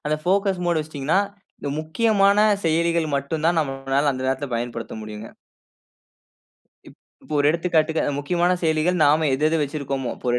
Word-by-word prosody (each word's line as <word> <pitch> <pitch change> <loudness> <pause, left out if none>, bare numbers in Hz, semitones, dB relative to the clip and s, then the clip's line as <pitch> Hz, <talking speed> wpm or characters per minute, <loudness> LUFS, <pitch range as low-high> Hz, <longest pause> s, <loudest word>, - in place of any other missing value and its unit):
அந்த 155 0 +1
focus 195 +1 +1
mode 170 -2 +2
வச்சுட்டீங்கனா, 155 +2 -1 0.4
இந்த 145 - -5
முக்கியமான 200 +4 +2 0.3
செயலிகள் 165 -1 +1
மட்டும் 150 +3 -3
தான் 170 -1 +2
நம்மளால 135 0 0
அந்த 130 - -5
நேரத்தில 135 +1 -1
பயன்படுத்த 115 -1 -4
முடியுங்க. 105 +1 -8 1.6
இப் - - -16 0.3
இப்ப - - -11
ஒரு 145 - +3
எடுத்துக்காட்டுக்கு 160 -1 +1 0.2
முக்கியமான 175 +5 +1
செயலிகள் 160 +2 +1
நாம 155 +2 +3
எது 150 +3 -1
எது 165 - +1
வச்சிருக்கோமோ 140 -3 -3
இப்போ - - -10
ஒரு 120 - +2
155 Hz, 150 wpm, -22 LUFS, 140-170 Hz, 1.6 s, ஒரு